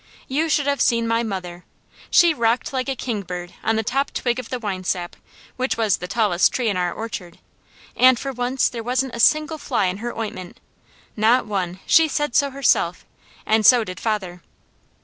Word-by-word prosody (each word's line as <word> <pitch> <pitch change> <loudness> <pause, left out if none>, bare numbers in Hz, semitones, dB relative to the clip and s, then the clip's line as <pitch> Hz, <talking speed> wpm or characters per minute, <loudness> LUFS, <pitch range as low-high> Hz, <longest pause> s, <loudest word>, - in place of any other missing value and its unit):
You 310 +5 0
should 290 -2 +1
have 280 -2 0
seen 230 -1 +2
my 230 0 +1
mother! 180 -5 -5 0.5
She 345 -2 +5
rocked 235 0 0
like 260 0 -2
a 270 - -1
kingbird 180 -8 -5
on 225 - +1
the 220 - 0
top 275 +6 -1
twig 240 0 -1
of 250 - -8
the 255 - -2
winesap, 185 -5 -3 0.4
which 255 -1 -1
was 220 -4 +2
the 180 - -7
tallest 200 -4 +2
tree 245 -3 -1
in 200 - -1
our 180 -1 0
orchard, 190 -6 -7 0.6
and 255 -1 +6
for 275 +3 -4
once 250 +1 0
there 235 - -5
wasn't 255 +2 -1
a 235 - -6
single 310 +5 +3
fly 245 -8 0
in 185 +1 -1
her 240 +3 -6
ointment, 185 -5 -6 0.6
not 225 +3 +3
one, 190 -3 -3
she 325 0 +5
said 295 -3 -2
so 280 - +3
herself, 255 -10 +1 0.4
and 220 0 +2
so 245 +1 +6
did 185 -3 -8
father. 190 -6 -3
230 Hz, 190 wpm, -22 LUFS, 190-260 Hz, 0.6 s, and